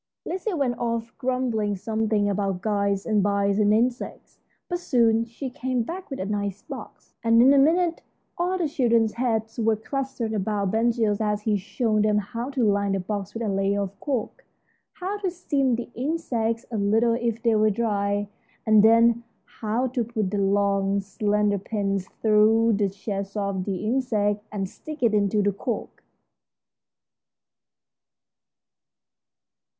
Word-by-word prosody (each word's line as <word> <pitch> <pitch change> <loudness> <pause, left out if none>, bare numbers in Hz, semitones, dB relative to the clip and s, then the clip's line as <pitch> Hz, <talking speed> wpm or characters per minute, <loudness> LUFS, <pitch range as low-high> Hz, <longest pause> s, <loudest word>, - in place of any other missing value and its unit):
Lizzie 375 +3 -3
went 260 -5 -1
off 230 -1 -2
grumbling 245 -5 0
something 215 +1 0
about 195 -2 -1
guides 200 -2 0
and 215 -3 +2
bites 200 0 +1
and 210 -1 +4
insects, 240 +3 -1 0.3
but 350 -1 -2
soon 230 -7 +2
she 240 +3 -7
came 255 -2 -1
back 360 +9 -7
with 270 - -5
a 190 - -2
nice 200 -1 -3
box, - - -10
and 230 0 +4
in 260 +4 +7
a 280 - +5
minute 335 +4 +3 0.3
all 360 +1 0
the 345 -3 0
children's 235 -6 +2
heads 225 -2 -1
were 225 -1 +3
clustered 260 0 -3
about 200 -1 -1
Ben 225 +2 +2
Gile 220 -3 0
as 210 -1 0
he 215 -1 +1
showed 215 +2 0
them 210 0 +2
how 235 +4 -3
to 270 -3 -1
line 200 -2 +2
the 195 - 0
box 200 +2 -4
with 230 - -3
a - - -1
layer 195 0 +1
of 195 0 -8
cork, 260 -7 -3 0.5
how 390 +3 -4
to 390 -2 -1
steam 280 -8 0
the 240 +1 -6
insects 240 -5 -2
a 225 - -2
little 220 +4 +3
if 235 -1 -2
they 230 -2 +3
were 215 0 +4
dry, 205 -2 0 0.4
and 215 -1 +6
then 230 +1 +5 0.4
how 225 +3 0
to 250 -1 -1
put 215 -4 -2
the 205 - -1
long, 200 0 +2
slender 205 +1 0
pins 200 -2 -2 0.2
through 220 +1 +4
the 200 -1 +1
chest 195 +1 -5
of 200 -2 -2
the 195 0 -3
insect 215 -4 0
and 195 -2 -2
stick 305 +8 -9
it 230 -2 +4
into 205 0 +2
the 205 - +2
cork. 225 +4 -5
220 Hz, 160 wpm, -25 LUFS, 205-240 Hz, 0.5 s, in